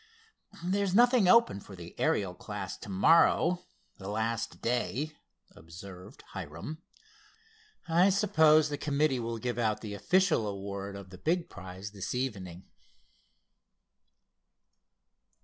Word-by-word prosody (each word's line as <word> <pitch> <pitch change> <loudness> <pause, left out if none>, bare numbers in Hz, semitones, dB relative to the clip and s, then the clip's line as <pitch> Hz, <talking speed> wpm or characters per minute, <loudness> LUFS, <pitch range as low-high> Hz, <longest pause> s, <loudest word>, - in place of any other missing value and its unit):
"There's 195 0 0
nothing 240 -3 +5
open 230 - +5
for 100 0 -12
the 85 -1 -10
Ariel 95 -3 +1
class 90 - -6
to - - -11
morrow, 165 - +4 0.3
the 95 - -8
last 110 +2 -2
day," 130 +5 -2 0.4
observed 90 +3 -12
Hiram. 85 - -7 1.1
"I 175 +4 +4
suppose 160 -6 +4
the 145 - -4
committee 145 -2 +1
will 115 0 -3
give 120 0 -3
out 110 -2 0
the 105 -2 -6
official 180 - +2
award 100 0 -5
of 100 -2 -10
the 95 - -11
big 170 +2 -1
prize 95 +1 -8
this 100 +3 -5
evening." 95 -9 -4
115 Hz, 115 wpm, -30 LUFS, 100-165 Hz, 1.1 s, nothing